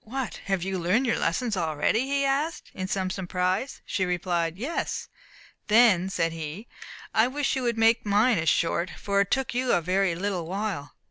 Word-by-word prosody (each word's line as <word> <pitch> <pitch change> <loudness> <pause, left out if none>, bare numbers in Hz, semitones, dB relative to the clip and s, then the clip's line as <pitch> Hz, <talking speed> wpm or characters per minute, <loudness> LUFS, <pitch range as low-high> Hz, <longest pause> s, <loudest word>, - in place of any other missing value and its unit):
"What! 245 -5 -4
have 195 -3 0
you 190 0 -2
learned 190 +10 +2
your 235 - +1
lessons 220 +5 0
already?" 165 - 0
he 280 0 +1
asked, 285 +5 -1
in 185 -1 -4
some 190 -1 -1
surprise. 185 +6 -2
She 190 - -1
replied, 175 -2 -1
"Yes." 275 +11 -3 0.6
"Then," 210 -5 +5
said 165 -3 0
he, 165 +7 -6 0.5
"I 220 +2 +4
wish 280 +2 -1
you 265 - -1
would 235 -2 0
make 225 +1 +4
mine 210 +1 +3
as 160 0 +2
short, 170 +4 +1
for 200 0 +1
it 200 - -1
took 265 -2 0
you 250 0 0
a - - +4
very 180 +1 +1
little 180 -2 -2
while." 190 -6 -4
195 Hz, 185 wpm, -26 LUFS, 175-240 Hz, 0.6 s, Then